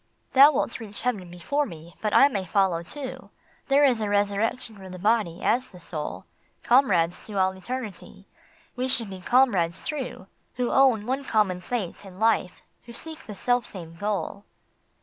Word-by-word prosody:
" - - -40
Thou 275 +3 +9
wilt 245 - -1
reach 210 -3 -2
heaven 210 -8 -1
before 280 +12 -1
me, 165 0 -11
but 215 - 0
I 275 - +7
may 205 -9 -2
follow 185 -2 +1
too. 265 - -8 0.4
There 285 +1 +5
is 245 -5 +2
a 210 - -1
resurrection 205 +3 0
for 190 -2 -11
the 185 - -8
Body, 205 -3 +1
as 255 +2 +2
the 180 - -14
Soul; 155 -3 -6 0.4
Comrades 190 -10 +3
to 210 -2 -5
all 190 0 +3
eternity, 220 +2 -7 0.5
we 255 0 -1
should 230 -5 +1
be 190 -1 -8
comrades 195 -8 +3
true 270 -10 -5 0.3
Who 250 -1 -1
own 255 -6 +4
one 265 +3 -1
common 205 -7 +1
fate 205 -3 -4
and 190 -1 -12
life, 220 -5 +1 0.2
who 235 - -11
seek 320 +5 -9
the 210 - -7
self 245 +3 +1
same 170 -4 -9
goal. 205 +1 -3
210 Hz, 175 wpm, -26 LUFS, 185-250 Hz, 0.5 s, Thou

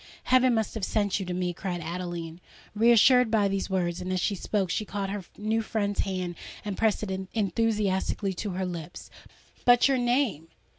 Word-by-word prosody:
—heaven 255 -1 +4
must 220 -1 -1
have 220 - -5
sent 205 0 0
you 190 - -5
to - - -3
me!" 180 -1 -1
cried 180 0 -4
Adeline, 170 0 -5 0.3
reassured 235 +2 +5
by 215 -2 +3
these 195 0 -2
words; 175 -2 -1
and, 185 +1 -4
as 185 - 0
she 200 - 0
spoke, 195 -1 -1
she - - 0
caught 195 -1 -4
her 200 -3 -5
new 220 +2 0
friend's 205 -2 -2
hand 185 -2 -1 0.3
and 205 -2 -3
pressed 220 0 +1
it 190 -2 -4
enthusiastically 205 -1 0
to 205 +3 -4
her 185 0 -2
lips. 175 -1 -7 0.5
"But, 245 +1 +6
your 270 -2 +2
name! 240 - +1
200 Hz, 185 wpm, -27 LUFS, 180-220 Hz, 0.5 s, But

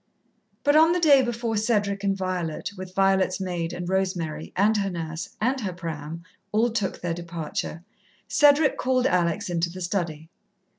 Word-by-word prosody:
But 290 +1 +4
on 320 +2 +6
the 360 - +1
day 290 -5 +6
before 235 -2 -2
Cedric 205 -2 0
and 195 -1 +1
Violet, 185 -3 -3
with 185 -1 -9
Violet's 195 -1 +2
maid, 175 -3 -3
and 175 0 -5
Rosemary, 180 -5 -2
and 210 +3 +3
her 200 -1 0
nurse, 165 -2 -5
and 255 +4 0
her 190 -4 -3
pram, 165 -2 -6 0.3
all 230 +3 +2
took 210 -4 -2
their 175 -1 -1
departure, 165 -1 -5 0.4
Cedric 290 0 +4
called 255 -1 +1
Alex 180 0 +1
into 170 -1 0
the 185 +2 -9
study. 170 -4 -3
190 Hz, 160 wpm, -25 LUFS, 170-220 Hz, 0.4 s, on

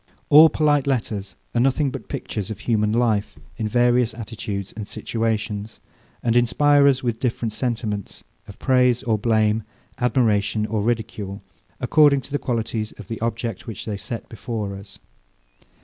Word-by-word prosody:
All 155 +2 +9
polite 145 -3 +2
letters 110 -7 -2 0.2
are 120 - +2
nothing 135 +2 +2
but 125 -6 -8
pictures 105 -2 -4
of 105 -1 -6
human 105 -3 +1
life 110 -3 +1 0.2
in 110 -3 -1
various 120 0 +2
attitudes 105 -3 -5
and 105 -1 -6
situations; 110 -2 -3 0.4
and 115 -1 +1
inspire 140 +4 +4
us 130 -2 +2
with 120 -2 -1
different 115 -3 -1
sentiments, 110 -4 -3 0.2
of 100 - -11
praise 125 -1 +3
or 110 -4 +1
blame, 110 0 +2 0.4
admiration 110 -4 +2
or 110 -1 -1
ridicule, 105 -3 -3 0.4
according 145 -3 +4
to 130 - -14
the 145 - 0
qualities 115 -2 -2
of 105 - -12
the 115 -2 -5
object, 115 -2 -3
which 110 -5 -6
they 105 - -3
set 115 +3 -6
before 110 -3 -5
us. 100 +1 -11
115 Hz, 150 wpm, -23 LUFS, 105-125 Hz, 0.4 s, All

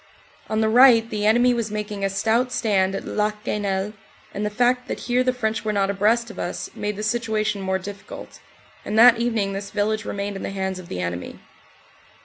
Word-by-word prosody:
On 215 0 0
the 220 - +2
right 230 0 +6
the 210 -2 -1
enemy 240 +3 +4
was 230 -2 -2
making 210 -1 -4
a 195 - +1
stout 230 +5 +1
stand 195 -5 +1
at - - -5
Le 210 0 0
Quesnel, 205 -1 -3 0.4
and 205 - -3
the 210 - 0
fact 245 +3 +1
that - - -4
here 250 +1 +1
the 255 - +2
French 225 -3 -2
were 215 - -1
not 200 -1 +1
abreast 225 +4 +1
of - - -11
us 175 - -4
made 210 0 -3
the 210 - -5
situation 215 -2 -1
more 190 0 0
difficult, 195 +1 -9 0.4
and 215 - -3
that 235 0 +8
evening 225 -4 0
this 195 0 -5
village 215 +1 -1
remained 200 -1 -4
in - - -8
the - - -4
hands 190 -1 -3
of 180 - -11
the 90 - -4
enemy. 85 0 -4
210 Hz, 205 wpm, -23 LUFS, 200-230 Hz, 0.4 s, that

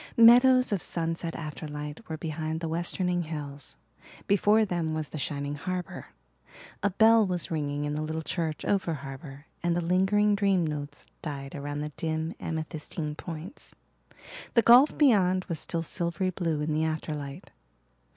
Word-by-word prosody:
Meadows 250 +2 +7
of 200 -4 0
sunset 165 0 -2
afterlight 150 +2 -6
were 160 - -3
behind 155 0 -3
the 165 - -3
westerning 175 +2 0
hills. 145 -3 -7 0.5
Before 210 +2 +4
them 170 -4 -2
was 155 -2 -3
the 155 - -6
shining 145 0 -2
harbour. 180 +4 -5 0.7
A 205 - +2
bell 220 +3 +5
was 180 -2 -2
ringing 145 -2 -2
in 145 - -2
the 150 - -2
little 160 +1 -3
church 160 -2 -3
over 190 -5 +1
harbour 135 +1 -9 0.2
and 175 0 +1
the - - +2
lingering 190 +4 +3
dream 195 -4 +2
notes 145 -2 -5 0.2
died 140 -3 -6
around 145 0 -4
the 150 0 -5
dim, 160 0 -2
amethystine 155 -1 -4
points. 170 - -8 0.8
The 235 - +6
gulf 250 +5 +7
beyond 185 -10 +4
was 165 -4 -4
still 165 -1 -2
silvery 170 +3 -2
blue 165 -4 -1
in 150 +1 -1
the 155 +1 +1
afterlight. 150 -3 -4
165 Hz, 150 wpm, -28 LUFS, 150-185 Hz, 0.8 s, Meadows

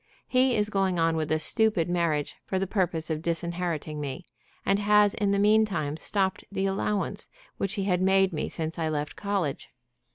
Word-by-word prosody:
He 255 -1 +3
is 210 0 +1
going 195 -3 +1
on 165 0 +2
with 155 -1 -2
a 155 - +3
stupid 210 +1 +2
marriage 170 -4 0
for 190 - -2
the 190 - 0
purpose 175 -5 -1
of 155 -1 -2
disinheriting 170 -2 -3
me, 145 +5 -5 0.4
and 200 - +2
has 210 0 +4
in 205 -1 0
the 200 - +2
mean 210 +2 +5
time 155 -8 -2
stopped 190 +4 -1
the 195 -1 -1
allowance 195 +1 -1 0.3
which 195 +2 -2
he 200 - -1
had 180 -2 +1
made 190 0 +3
me 150 - -2
since 160 +1 -4
I 160 -1 0
left 150 -1 -3
college. 195 -9 -2
185 Hz, 190 wpm, -27 LUFS, 160-200 Hz, 0.4 s, mean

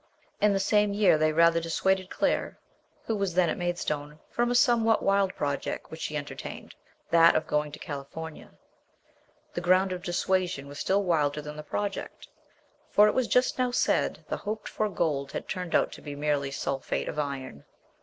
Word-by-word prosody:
In 210 - +5
the 195 - +1
same 210 +1 +2
year 200 -6 +4
they 155 0 +3
rather 165 +1 +4
dissuaded 185 +3 0
Claire, - - -1 0.5
who 225 - -1
was 195 -4 -1
then 180 -2 +4
at - - -2
Maid 175 0 -1
stone, 150 -1 -3
from 240 0 +1
a 245 - +1
somewhat 235 -3 +4
wild 195 -1 +2
project 140 -1 -3
which 160 - -8
she 150 - -3
enter 145 0 -5
tained, - - -8 0.4
that 165 0 +6
of 155 - +1
going 150 0 -1
to 145 - -8
California. 150 +2 -7 1.0
The 175 - -3
ground 185 +2 +3
of 180 -1 -4
dissuasion 175 -4 -1
was 145 +1 -9
still 200 +1 +1
wilder 150 -5 +1
than 150 0 -7
the 150 - -6
project, 200 - -4 0.6
for 210 +1 +6
it 210 - +2
was 255 -3 +1
just 250 +1 +2
now 250 -1 +2
said 245 - 0
the - - -2
hoped 215 +1 -5
for 215 -1 -1
gold 150 -6 -1
had - - -5
turned 180 -2 -3
out - - +3
to - - -10
be 145 -1 -7
238 - - -10
MBS. - - -7
SHELLEY. 150 - +1
merely 135 0 -4
sulphate 135 0 -2
of 150 - -4
iron. 135 - -4
175 Hz, 200 wpm, -28 LUFS, 150-200 Hz, 1.0 s, that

